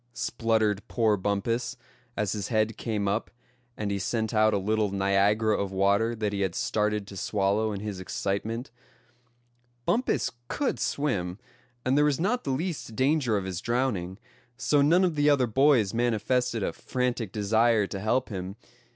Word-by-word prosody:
spluttered 110 -3 0
poor 110 -3 +2
Bumpus, 105 +5 -1 0.4
as 105 -3 0
his 105 -2 -3
head 110 -1 +1
came 105 -3 -2
up, 105 +3 -1 0.5
and 105 -2 -2
he 100 - -1
sent 110 +3 -1
out 110 0 +4
a 105 - +1
little 105 +2 0
Niagara 100 +3 +2
of 100 -1 -2
water 100 +4 +2
that 105 -2 -2
he 100 - -2
had 95 -3 -1
started 105 -1 0
to 100 - -11
swallow 100 +3 0
in 100 -1 -4
his 105 -3 -5
excitement. 110 +6 -3 1.1
Bumpus 250 +3 +1 0.2
could 285 - -1
swim, 100 -11 -1 0.5
and 130 +1 +2
there 150 +1 +4
was 145 -3 +1
not 220 +8 0
the - - -2
least 145 -4 -3
danger 130 -4 +2
of 95 - -3
his 95 -1 -4
drowning; 115 -7 -1 0.4
so 145 +2 +2
none 170 +6 +4
of 180 -3 +2
the 145 0 +3
other 140 -3 +4
boys 120 -3 +3
manifested 120 0 0
a - - -1
frantic 125 -5 -2
desire 110 +1 +2
to 100 0 -5
help 120 +6 0
him. 95 -2 -5
110 Hz, 165 wpm, -27 LUFS, 100-125 Hz, 1.1 s, out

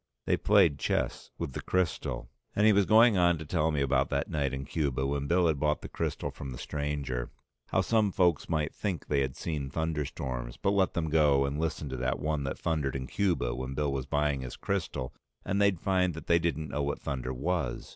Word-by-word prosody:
They - - +3
played 75 -4 +4
chess - - -1
with 65 - -4
the - - -4
crystal. 85 -8 -1 0.3
And 105 - +3
he 110 - +7
was 100 -1 +3
going 110 -1 +6
on 85 -1 +4
to 80 - -7
tell 75 +1 +1
me 75 -3 0
about 70 - +2
that - - -1
night 70 -3 0
in 65 +1 -4
Cuba 70 -4 -1
when 70 0 -1
Bill 90 +2 +3
had 80 -4 +2
bought 75 +1 0
the - - -5
crystal - - -3
from 70 - -7
the 60 - -7
stranger, 70 -5 -3 0.4
how 95 - +2
some 105 +1 +2
folks 90 -4 +2
might 80 -2 0
think 95 -6 -3
they 70 -2 +2
had 65 -1 -2
seen 75 -5 -3
thunderstorms, 65 -6 -3
but 100 - +1
let 95 -2 +2
them 80 -3 -1
go 75 -3 +4
and 70 +2 -2
listen 80 -2 -2
to 65 - -4
that 65 0 0
one 75 -2 -1
that 70 - -3
thundered 75 -5 -1
in 65 -1 -3
Cuba 85 -8 0
when 65 +2 -5
Bill 75 -1 0
was 65 -2 -3
buying 75 -2 +1
his 65 - -6
crystal 85 -9 -3 0.3
and 100 +1 0
they'd 100 -4 +3
find 90 -3 +1
that 80 - -8
they 85 0 +4
didn't 80 -3 -1
know 75 - -1
what 70 0 -2
thunder 65 -2 -3
was. 70 -1 -2
75 Hz, 220 wpm, -30 LUFS, 70-85 Hz, 0.4 s, he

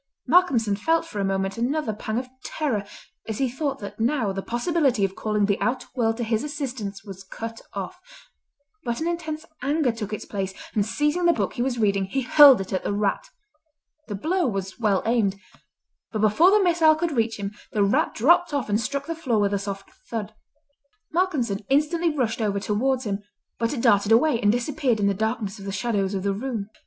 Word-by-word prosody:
Malcolmson 260 - +3
felt 325 +10 +1
for 215 -11 -6
a - - +1
moment 195 +1 -1
another 255 -1 0
pang 215 +1 -4
of 250 +1 -2 0.2
terror 245 -10 -2 0.4
as 220 -2 -3
he 270 - +1
thought 270 +2 -2
that 205 -1 -9
now 230 -3 +1
the 195 0 -3
possibility 245 - +1
of 190 - -4
calling 210 -1 0
the 200 0 0
outer 245 0 0
world 225 -3 0
to 240 - -2
his 220 -1 0
assistance 255 -9 -5
was 195 -2 -9
cut 225 +4 -7
off, - - -5 0.8
but 235 -2 -2
an 320 - -1
intense 320 -2 -3 0.2
anger 280 0 +1
took 220 -2 -6
its 215 - -5
place, 195 -2 -4 0.2
and 205 -1 +1
seizing 295 +8 0
the 340 - +5
book 200 - -2
he - - -3
was 250 -1 0
reading 200 -3 +2
he 265 +8 -2
hurled 275 0 +8
it 195 0 -5
at 185 - -1
the - - -1
rat. 205 - -1 0.8
The 205 - -4
blow 345 - 0
was 195 -3 -4
well 205 -4 +2
aimed, 215 -4 +1 0.7
but 215 - -2
before 220 - +5
the 415 0 +4
missile 330 -3 +5
could 335 +1 -1
reach 230 -4 0
him 200 -1 -4 0.2
the 210 - +2
rat 200 - +1
dropped 330 +6 +4
off 265 -6 -2
and 210 +2 +2
struck 280 +4 -3
the 330 - -3
floor 270 -9 -1
with 205 -1 +1
a 200 - +1
soft 195 0 -6 0.2
thud. 220 -2 -4 0.8
Malcolmson 280 - 0
instantly 305 +5 +2
rushed 250 -7 -1
over 200 -2 0
towards 250 +6 0
him, 205 -3 -3 0.4
but 230 0 0
it 260 - -3
darted 205 0 +3
away 235 +2 +4
and 205 -2 +4
disappeared 245 0 0
in 205 - +1
the 200 - +3
darkness 220 0 -2
of 195 - -9
the 195 - -3
shadows 200 -1 -1
of 190 - -2
the 200 0 +1
room. 220 -2 -4
230 Hz, 205 wpm, -24 LUFS, 205-285 Hz, 0.8 s, hurled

